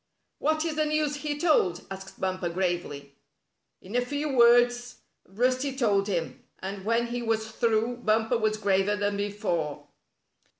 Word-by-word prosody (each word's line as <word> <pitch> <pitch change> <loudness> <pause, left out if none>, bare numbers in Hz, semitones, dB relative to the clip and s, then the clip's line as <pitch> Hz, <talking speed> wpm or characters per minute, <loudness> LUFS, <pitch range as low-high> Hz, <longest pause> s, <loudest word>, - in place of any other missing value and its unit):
"What 310 +2 +1
is 315 -2 -2
the 310 - +2
news 300 -1 0
he 290 0 -3
told?" 290 - +2
asked 195 0 -9
Bumper, 185 -2 -1
gravely. 170 -6 -3 0.7
In 195 +5 -8
a 245 - +3
few 285 +2 -3
words 245 0 +4 0.3
Rusty 255 +7 0
told 205 -6 +2
him, 170 -5 -3
and 195 0 -6
when 230 +3 +1
he 240 +1 -4
was 220 -1 -1
through 230 +1 0
Bumper 225 0 +1
was 215 -1 +1
graver 200 0 +2
than 205 0 -1
before. 200 -7 -2
220 Hz, 145 wpm, -27 LUFS, 195-245 Hz, 0.7 s, words